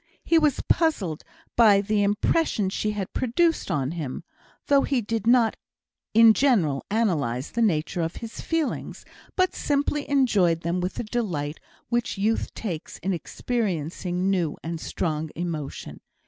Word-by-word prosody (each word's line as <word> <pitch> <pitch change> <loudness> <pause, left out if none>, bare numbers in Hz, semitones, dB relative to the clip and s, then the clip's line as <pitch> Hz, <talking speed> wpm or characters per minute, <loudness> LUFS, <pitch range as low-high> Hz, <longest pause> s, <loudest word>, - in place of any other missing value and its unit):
He 330 - +4
was 300 -4 +1
puzzled 215 - +1 0.3
by 215 -4 +6
the 205 +1 +1
impression 205 +1 +1
she 215 - -1
had 200 -3 -4
produced 325 +7 +1
on 135 -1 0
him, 155 -6 -5 0.4
though 280 -1 +4
he 275 -2 +1
did 225 -1 -3
not 235 -2 +4 0.6
in 225 0 +8
general 195 - +2
analyse 155 - 0
the 235 - -1
nature 170 -5 +1
of 165 0 -2
his 230 -1 -7
feelings, 325 -3 -2 0.3
but 370 0 +2
simply 290 0 -1
enjoyed 205 - +3
them 170 +2 -1
with 180 +1 -3
the - - -3
delight 180 -11 -3 0.3
which 240 -3 -1
youth 215 +3 0
takes 175 -8 -5
in 195 +1 -2
experiencing 180 -2 -2
new 175 -6 0
and 165 0 -4
strong 155 -2 -2
emotion. 160 -4 -5
200 Hz, 145 wpm, -25 LUFS, 165-240 Hz, 0.6 s, in